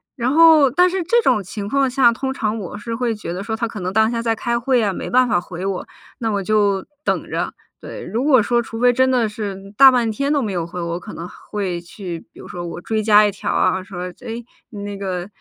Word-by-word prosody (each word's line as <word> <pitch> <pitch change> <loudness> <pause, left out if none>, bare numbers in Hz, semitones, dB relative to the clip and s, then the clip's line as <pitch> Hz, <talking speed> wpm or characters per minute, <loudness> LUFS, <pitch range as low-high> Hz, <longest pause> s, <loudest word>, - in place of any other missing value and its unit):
然 245 -1 -1
后 315 -3 +7
但 360 +5 +4
是 380 +1 -2
这 470 +7 +3
种 210 - +2
情 200 +2 -6
况 275 +1 +2
下， 250 -2 +4
通 265 +3 -3
常 215 -3 -2
我 205 -1 -6
是 230 +2 -5
会 240 -1 -1
觉 210 -5 -6
得 185 +3 -4
说 220 0 -3
他 230 0 -2
可 220 - -7
能 185 +1 -3
当 220 +1 +4
下 230 -1 -2
在 230 -1 0
开 235 +1 -1
会 255 +1 +2
呀， 210 -3 +1
没 - - -5
办 255 0 +4
法 210 -6 +2
回 180 +1 -7
我， 195 -2 -3 0.3
那 225 -2 -1
我 200 - -1
就 200 -2 +2 0.2
等 - - -1
着， - - -2 0.3
对。 - - -8
如 225 +8 -2
果 270 -5 +5
说 240 +3 +1
除 225 -1 -7
非 245 +1 +5
真 260 +1 +2
的 240 -4 +2
是 210 -2 -5 0.2
大 270 -1 +10
半 240 -3 +1
天 280 +6 -1
都 285 - +2
没 215 -5 -2
有 175 -3 -2
回， 175 +1 -6
我 170 +1 -3
可 - - -10
能 170 +2 -7 0.2
会 190 -4 -2
去， 175 0 -7
比 - - -16
如 - - -10
说 175 -1 -6
我 170 - -7
追 220 +2 -1
加 210 0 +6
一 205 - +1
条 195 - -4
啊， 185 0 +2
说： 180 -2 -6
“诶， 230 +1 -6 0.3
你 205 -2 -7
那 205 -1 -5
个， 185 -2 -4
220 Hz, 275 characters per minute, -20 LUFS, 190-245 Hz, 0.3 s, 大